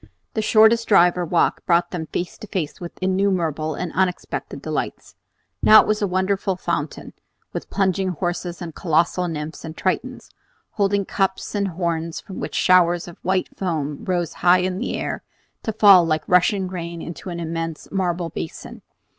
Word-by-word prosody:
The 220 - 0
shortest 220 +1 +5
drive 180 -4 +5
or 180 -1 -2
walk 170 +1 +1
brought 170 0 +3
them 165 -3 -4
face 175 +2 -4
to 215 - -9
face 175 -5 -4
with 175 - -8
innumerable 180 -5 0
and 180 +1 -4
unexpected 185 -2 -2
delights. - - -4 0.5
Now 215 0 +9
it - - -4
was 215 0 0
a 205 - +2
wonderful 190 +1 0
fountain, 165 -4 -4 0.4
with - - -5
plunging 190 -1 +1
horses 175 0 -3
and 165 -2 -7
colossal 170 +2 +1
nymphs 155 -1 -5
and 160 0 -8
Tritons, 255 +7 -2 0.4
holding 200 -1 +1
cups 190 0 -1
and 200 -1 0
horns 170 -2 -2
from 190 - -9
which - - -5
showers 175 -1 +4
of 175 - -11
white 185 0 -1
foam 150 -6 -3
rose 175 -3 -1
high 180 +1 +5
in 185 +1 -2
air - - -3 0.4
to 220 - -2
fall 200 -4 +7
like 155 -2 0
rushing 185 +2 +3
rain 170 -2 -6
into 170 +2 -7
an 170 -1 -5
immense 165 -1 -4
marble 175 -3 -1
basin. 80 - -7
180 Hz, 165 wpm, -22 LUFS, 170-190 Hz, 0.5 s, Now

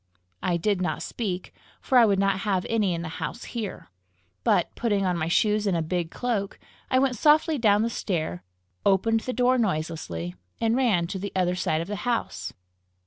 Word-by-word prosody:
I 175 -1 +1
did 195 +2 0
not 180 - -1
speak, 190 -6 -4 0.3
for 265 - -1
I 235 - +7
would 200 -2 +2
not 195 -1 +2
have 195 -3 0
any 210 -6 +1
in 170 - -4
the - - -4
house 235 - -4
hear; 215 - -6 0.5
but, 175 - +2
putting 205 -4 0
on 180 -1 +1
my 160 -1 -1
shoes 210 +4 +2
and 185 -3 +2
a 165 - 0
big 170 0 -2
cloak, 215 -2 -2 0.3
I 255 - +3
went 260 -2 +2
softly 305 +3 +4
down 210 -2 +4
the 230 - 0
stair, 155 - -2 0.4
opened 215 +4 +3
the 255 - -4
door 250 0 +3
noiselessly, 155 - -2 0.3
and 225 0 +2
ran 225 -10 +2
to 190 +2 -4
the 200 +1 -4
other 180 -1 +2
side 165 -3 0
of 170 - -5
the 205 0 -3
house. 240 +4 -2
200 Hz, 195 wpm, -26 LUFS, 175-230 Hz, 0.5 s, I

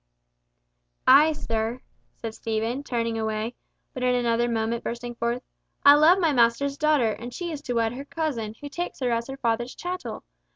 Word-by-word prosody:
"Ay, 290 +5 +7
sir," 230 -4 -2 0.4
said 225 -1 -6
Stephen, 225 +4 -2
turning 230 -4 -2
away, 220 +1 -2 0.4
but 255 - -6
in 250 0 +2
another 240 -1 +1
moment 230 0 -1
bursting 240 +1 -4
forth, 235 +1 -2 0.4
"I 285 - +11
love 310 +5 +6
my 330 -5 +2
master's 245 +3 +3
daughter, 295 -6 +2
and 235 +3 -7
she 345 +5 -4
is 295 -2 -5
to 245 -4 -3
wed 230 0 +1
her 275 +3 -7
cousin, 265 -9 -3
who 290 - -6
takes 345 +5 -5
her 250 -2 +1
as 230 0 -1
her 270 0 -6
father's 240 -1 -1
chattel! 355 -11 -5
240 Hz, 175 wpm, -25 LUFS, 230-285 Hz, 0.4 s, I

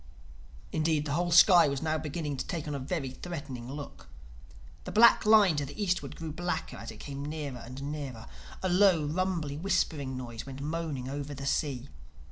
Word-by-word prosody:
Indeed 155 -1 +1
the 145 - -3
whole 175 +4 +1
sky 175 -1 +8
was 140 -1 -1
now 155 0 0
beginning 150 -1 -3
to - - -4
take 165 -5 -4
on 150 - -3
a 140 - -3
very 135 -1 -3
threatening 135 -6 -7
look. 145 0 -8 0.8
The - - -5
black 230 0 +6
line 210 -6 +7
to 145 - 0
the 145 - -10
eastward 185 -3 -1
grew 160 -1 -6
blacker 175 -5 -3
as 115 +2 -8
it - - -9
came 140 -1 -6
nearer 145 -4 -5
and 130 +4 -8
nearer. 140 -6 -5 0.4
A 185 - +1
low, 180 -4 +4
rumbly, 165 -2 -1
whispering 155 -7 0
noise 120 -3 -6
went 135 0 -8
moaning 150 -3 -3
over 140 +1 -5
the 140 +1 -6
sea. 140 -2 -1
150 Hz, 185 wpm, -30 LUFS, 140-170 Hz, 0.8 s, sky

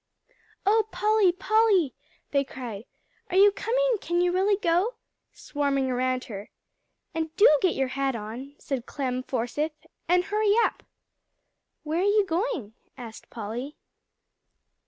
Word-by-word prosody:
"Oh 430 +2 +3
Polly, 425 -3 +3
Polly!" 385 - +2 0.4
they 280 -1 +2
cried, 240 -5 -8 0.4
"are 370 - 0
you 405 +1 +7
coming - - +1
can 345 +1 0
you 355 0 +3
really 385 +3 +2
go?" 375 +5 +1 0.4
swarming 275 -2 -1
around 255 0 0
her. 205 -2 -8 0.6
"And 320 0 -3
do 420 - +7
get 370 -3 +2
your 265 -1 0
hat 270 -1 -1
on," 235 +6 -7
said 260 -4 -4
Clem 255 -3 -2
Forsythe 255 +4 -2 0.4
"and 355 +1 +3
hurry 420 +1 +2
up." - - -1 1.0
"Where 315 +2 -1
are - - +1
you 410 0 +3
going?" 335 - -2 0.2
asked 230 -3 -10
Polly. 235 +6 -6
320 Hz, 135 wpm, -26 LUFS, 255-405 Hz, 1.0 s, you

